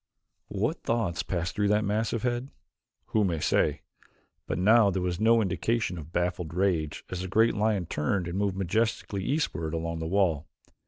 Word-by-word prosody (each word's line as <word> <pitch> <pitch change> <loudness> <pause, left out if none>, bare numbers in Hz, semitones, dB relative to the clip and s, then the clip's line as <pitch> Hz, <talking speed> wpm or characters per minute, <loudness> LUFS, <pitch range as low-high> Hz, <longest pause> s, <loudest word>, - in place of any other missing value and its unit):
What - - -2
thoughts 105 -8 0
passed 85 -1 -3
through 105 -1 +1
that 105 +1 +2
massive 110 +3 -1
head? 125 +2 -1 0.6
Who 110 - +4
may 85 -5 0
say? - - +1 0.7
But - - -2
now 105 +3 +5
there 95 0 -1
was 90 -1 -2
no 115 +1 +4
indication 105 -2 -1
of 80 +1 -10
baffled 90 -2 -2
rage 85 -6 0
as 90 -1 -3
the 95 - -4
great 115 +5 +3
lion 105 -3 +1
turned 85 +3 -1
and 85 - -4
moved 100 -1 0
majestically 100 +1 -1
eastward 90 - -1
along 85 0 -3
the 80 - -3
wall. 85 -5 +1
95 Hz, 170 wpm, -28 LUFS, 85-110 Hz, 0.7 s, now